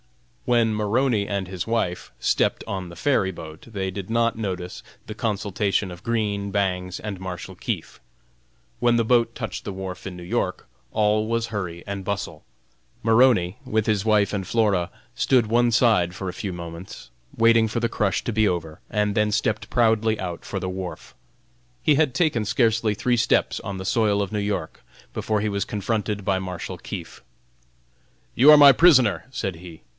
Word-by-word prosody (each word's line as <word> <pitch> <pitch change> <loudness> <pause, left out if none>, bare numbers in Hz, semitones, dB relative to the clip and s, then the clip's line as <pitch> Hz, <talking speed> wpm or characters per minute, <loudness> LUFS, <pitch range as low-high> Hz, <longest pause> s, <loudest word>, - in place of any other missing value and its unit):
When 115 -2 +3
Maroney 105 0 +1
and 100 -2 -2
his 90 -2 -4
wife 110 -6 -2
stepped - - +1
on 95 -2 -4
the 85 - -11
ferry 115 -10 +1
boat 80 0 -10
they 95 -4 -3
did 95 0 -7
not 115 0 +1
notice 95 -5 -4 0.2
the 110 - -6
consultation 105 -3 -1
of 90 +2 -11
Green, 105 -4 -1
Bangs 90 -2 -1
and 105 -3 -6
Marshal 90 -2 -6
Keefe. - - -5 0.8
When 120 -1 +3
the 115 - +2
boat 115 0 +3
touched 110 -3 -5
the 100 - -5
wharf 95 -1 -7
in 90 -2 -7
New 90 - -9
York, 85 - -2 0.2
all 110 0 +2
was 115 0 0
hurry 90 -6 -5
and 100 -1 -4
bustle. 100 +1 -4 0.6
Maroney, 110 -5 +4
with 110 0 0
his 105 -3 +1
wife 105 -2 +2
and 95 -2 -2
Flora, 100 -6 +1 0.3
stood 125 -4 +3
one 120 +2 +3
side 110 -7 +3
for 95 0 -5
a 90 - -3
few 95 +1 -4
moments, 85 +1 -9 0.3
waiting 115 0 +5
for 115 - -1
the 115 - +1
crush 105 -3 -1
to 120 - -2
be 110 0 +3
over, 80 -3 -3
and 105 -2 0
then 105 0 +2
stepped 110 0 -1
proudly 110 -2 +2
out 90 -3 -5
for 95 - -4
the 95 - -4
wharf. 90 -1 -6 0.7
He 150 +3 +4
had 145 -3 +2
taken 150 -9 +1
scarcely 115 -1 +1
three 125 +4 +1
steps 115 - +2
on 100 -1 -6
the 95 - -6
soil 105 0 +2
of 100 - -3
New 105 - 0
York 100 -6 -3 0.3
before 110 -1 -1
he 110 - 0
was 100 -1 -1
confronted 105 -1 -2
by 95 -1 +1
Marshal 90 -2 -6
Keefe. - - -8 1.1
"You 140 +6 +8
are 150 - +9
my 145 -1 +10
prisoner!" 130 - +5
said 95 -9 -4
he. 85 -2 -12
105 Hz, 180 wpm, -24 LUFS, 95-115 Hz, 1.1 s, my